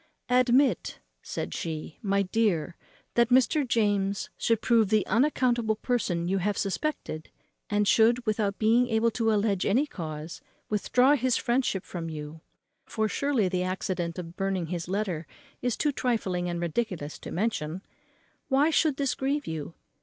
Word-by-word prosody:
"Admit," 255 +2 +3 0.2
said - - -5
she, 160 -2 -5
"my 200 -1 +1
dear, 185 -5 0 0.4
that 235 0 +3
Mr. 260 +3 +3
James 205 -4 0
should 230 -2 +1
prove 225 -3 +3
the 215 -1 +3
unaccountable 240 -3 +2
person 200 -8 -1
you 195 +2 +1
have 200 +2 -1
suspected, 195 - -3 0.4
and 205 0 +1
should, 235 +4 +4
without 210 -2 0
being 230 +3 +3
able 225 0 +2
to 225 0 0
alledge 205 -3 +1
any 245 +9 +2
cause, 160 - -7 0.3
withdraw 250 +6 +3
his 255 -2 +1
friendship 240 -6 0
from 165 -2 -5
you 155 0 -7 0.4
(for 220 -1 -1
surely 260 -2 +1
the 180 0 -1
accident 185 -2 -2
of 170 -1 -7
burning 195 -2 -1
his 170 +1 -4
letter 185 -6 -2 0.3
is 245 -2 -1
too 295 - +1
trifling 195 -9 -1
and 170 0 -3
ridiculous 170 -4 -3
to - - -8
mention), 185 -4 -2 0.6
why 285 +4 +3
should 305 -3 +2
this 275 -3 0
grieve 280 +3 -1
you? 160 0 -5
210 Hz, 150 wpm, -27 LUFS, 180-245 Hz, 0.6 s, should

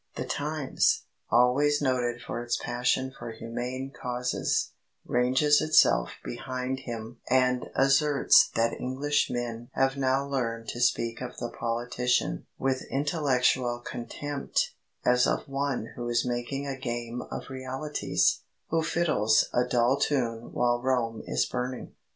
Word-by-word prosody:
The - - -3
Times, 150 -1 0 0.3
always 130 +5 +4
noted 125 -3 0
for 120 - -4
its 120 0 -1
passion 125 +2 0
for - - -6
humane 125 +4 -5
causes, 125 -1 -1 0.3
ranges 130 +4 +3
itself 155 - +4
behind 130 +1 -3
him 115 -2 -7
and 125 -1 +2
asserts 135 +1 +5
that 115 0 +2
Englishmen 125 -3 -1
have 135 +1 +1
now 135 0 +1
learned 115 -4 -2
to 120 - -4
speak 115 -1 +1
of 125 - -6
the 120 - -4
politician 120 +1 -1
"with 130 -1 0
intellectual 130 -4 +1
contempt, 140 +4 -3 0.3
as 125 0 +4
of - - -1
one 135 -4 -2
who 120 0 -4
is 120 0 +1
making 125 +3 -2
a 135 -1 -4
game 120 -1 -4
of - - -6
realities, 130 +3 0 0.3
who 165 0 +2
fiddles 155 -10 +2
a 125 - +3
dull 125 +2 +2
tune 120 -5 -1
while 120 0 +1
Rome 120 -3 0
is - - +1
burning." 125 0 -4
125 Hz, 130 wpm, -28 LUFS, 120-135 Hz, 0.3 s, asserts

